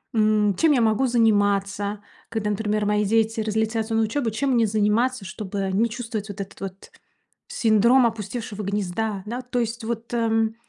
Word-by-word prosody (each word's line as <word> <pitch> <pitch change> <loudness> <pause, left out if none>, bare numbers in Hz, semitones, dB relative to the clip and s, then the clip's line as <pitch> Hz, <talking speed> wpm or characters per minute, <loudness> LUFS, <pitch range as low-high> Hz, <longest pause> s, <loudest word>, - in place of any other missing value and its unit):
м, 215 -2 +3
чем 320 - +3
я 250 - +3
могу 220 +4 +2
заниматься. 205 -3 +1 0.3
Когда, 220 -2 -2
например, 210 0 -1
мои 210 0 +2
дети 225 +1 +1
разлетятся 220 +1 -1
на 225 - +3
учёбу, 230 +1 -1
чем 265 +6 -1
мне 230 -2 +4
заниматься, 215 +3 +1
чтобы 195 0 -4
не 225 +4 +2
чувствовать 225 -3 -5
вот 200 0 -5
этот 195 0 -9
вот 195 0 -8 0.6
синдром 235 +3 +4
опустевшего 215 -1 -5
гнезда, 200 +1 -2
да. 245 +3 -4
То 250 0 -3
есть 230 0 -3
вот, 230 +1 -4
эм, 225 -1 +1
220 Hz, 165 wpm, -24 LUFS, 205-230 Hz, 0.6 s, мне